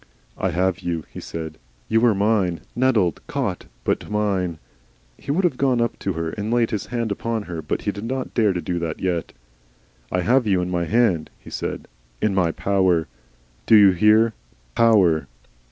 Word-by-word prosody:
"I 95 - -1
HAVE 90 +1 0
you,", 85 -3 -3
he - - -7
said. 80 -1 -7 0.3
"You 115 +1 +2
are 110 - +3
mine. 100 -4 +1
Netted 115 - +2
caught. - - -3 0.2
But - - -1
mine." 100 -5 0 0.6
He - - -14
would 165 +7 +1
have 170 -8 +1
gone 130 -3 +2
up 115 -1 -1
to 95 - -2
her 80 0 -3
and 105 +4 -4
laid 120 -1 +2
his 105 - -3
hand 115 -2 -2
upon 115 +2 -2
her, 85 -4 -6
but - - -3
he - - 0
did 100 +3 -7
not 130 +2 -3
dare 110 -4 +3
to 90 -2 -2
do 90 -1 -2
that 80 -2 -4
yet. 90 -3 -2 0.8
"I 90 - +1
have 120 +6 +2
you 95 -3 +3
in 90 0 -2
my 85 -1 0
hand," 100 -6 +2
he - - -14
said, - - -4 0.3
"in 105 - +1
my 90 -3 +2
power. 95 -4 +1 0.6
Do 110 - +7
you 100 -2 +8
hear 110 +5 +4 0.4
POWER!" 90 - +4
100 Hz, 185 wpm, -22 LUFS, 85-115 Hz, 0.8 s, you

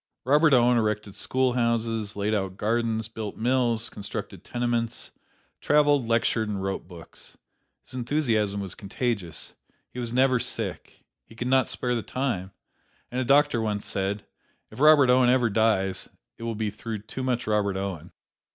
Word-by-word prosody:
Robert 150 +4 +5
Owen 120 -2 +5
erected 105 -2 -1
schoolhouses, 115 -4 0
laid 105 +1 -1
out 95 -2 -2
gardens, 110 0 0
built 110 -2 -6
mills, 120 -1 +1
constructed 100 - -6
tenements, 120 -1 -2 0.5
traveled, 145 -4 +3
lectured, 115 -1 +1
and 100 -2 -3
wrote 95 -2 -3
books. 85 -3 -12 0.5
His - - -12
enthusiasm 115 -6 0
was 95 -3 -5
contagious. 100 -5 -3 0.4
He 125 - -6
was 120 -2 -3
never 130 +1 +3
sick - - -4 0.2
he 115 - -17
could 120 +2 -4
not 130 -1 +3
spare 125 -1 -1
the 120 - -1
time 115 -8 -2 0.6
and 125 +1 -1
a - - 0
doctor 140 -2 +4
once 105 -2 -2
said, 100 +2 -2 0.5
"If - - -11
Robert 145 -3 +7
Owen 125 -1 +5
ever 125 -3 +3
dies, 100 -3 +1 0.3
it 115 - -6
will 115 -1 -2
be 105 -1 -2
through 110 0 -6
too 130 - -6
much 125 -2 -1
Robert 105 -3 +1
Owen." 95 -5 -5
115 Hz, 155 wpm, -26 LUFS, 105-125 Hz, 0.6 s, Robert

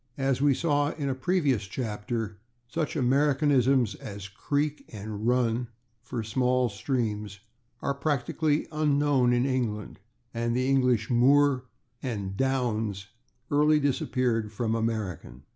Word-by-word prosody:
As 135 -1 0
we 140 -2 +4
saw 145 -2 +1
in 140 -3 -3
a - - +1
previous 130 - 0
chapter, 110 -1 -4 0.3
such 155 +6 -2
Americanisms 135 -3 +3
as 100 0 -8
/creek/ 145 +8 -2
and 105 0 -5
/run/, 120 -1 +1 0.3
for 120 -1 -4
small 125 +2 +1
streams, 105 -3 -2 0.4
are 140 - +1
practically 145 +2 0
unknown 145 -4 +2
in 120 +1 +2
England, 115 -8 -2 0.3
and 115 0 -1
the 130 +1 +1
English 125 -5 +2
/moor/ 130 +2 +4 0.4
and 100 -7 -4
/downs/ 110 -6 -1 0.4
early 150 +1 +4
disappeared 125 -5 0
from 110 +1 -1
American. 105 - -3
125 Hz, 120 wpm, -27 LUFS, 110-140 Hz, 0.4 s, we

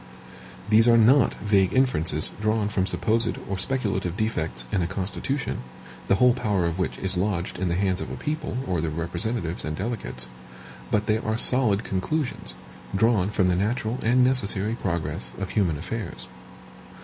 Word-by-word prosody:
These 110 +2 +5
are 115 -1 +6
not 120 +4 +5
vague 100 -1 +1
inferences 80 - +2
drawn 110 -1 +1
from 95 -2 0
supposed 115 +2 0
or 100 - -2
speculative 95 -6 -1
defects 80 - -2
in 95 - +1
a 85 - 0
Constitution, 100 +9 -3 0.5
the - - +4
whole 125 +4 +5
power 105 -7 0
of 85 +2 -2
which 90 - -1
is 95 -1 -3
lodged 90 -2 -2
in 95 -1 0
the 85 - 0
hands 95 0 0
of - - -5
a - - -5
people, 155 -5 -3
or 90 -4 -1
their 80 - -1
representatives 85 +4 -2
and 75 - -3
delegates, 95 - -4 0.6
but 105 0 +1
they 110 0 +1
are 110 0 -2
solid 115 -4 +5
conclusions, 130 +9 -2 0.4
drawn 105 -2 +3
from 95 -3 +1
the 90 - +2
natural 110 +4 -1
and 125 +3 +3
necessary 110 -5 +2
progress 85 -5 -3
of 95 0 -4
human 90 -8 +1
affairs. 95 +1 -5
100 Hz, 165 wpm, -25 LUFS, 90-115 Hz, 0.6 s, are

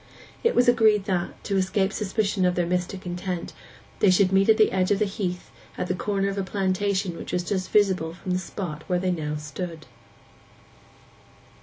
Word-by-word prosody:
It 465 - +2
was 245 +1 +4
agreed 220 -4 +4
that, 180 -3 -2
to 200 - -1
escape 190 +1 +1
suspicion 205 -1 0
of 180 -1 +2
their 175 - +1
mystic 180 +2 -2
intent, 180 0 -4 0.5
they 200 - +5
should 185 +1 +4
meet 195 +2 +3
at 220 - +6
the 215 - +4
edge 185 -1 +1
of 205 - +3
the 215 - +2
heath 195 -3 -4 0.3
at - - -1
the 185 - -1
corner 195 +1 -1
of 200 0 -2
a - - 0
plantation 190 -1 -1
which - - -7
was 180 - 0 0.2
visible 190 -6 +2
from 185 - -5
the 180 - +1
spot 170 -4 -6
where 180 - +2
they 185 +1 0
now 150 -3 -2
stood. 160 +2 -6
190 Hz, 185 wpm, -25 LUFS, 180-200 Hz, 0.5 s, at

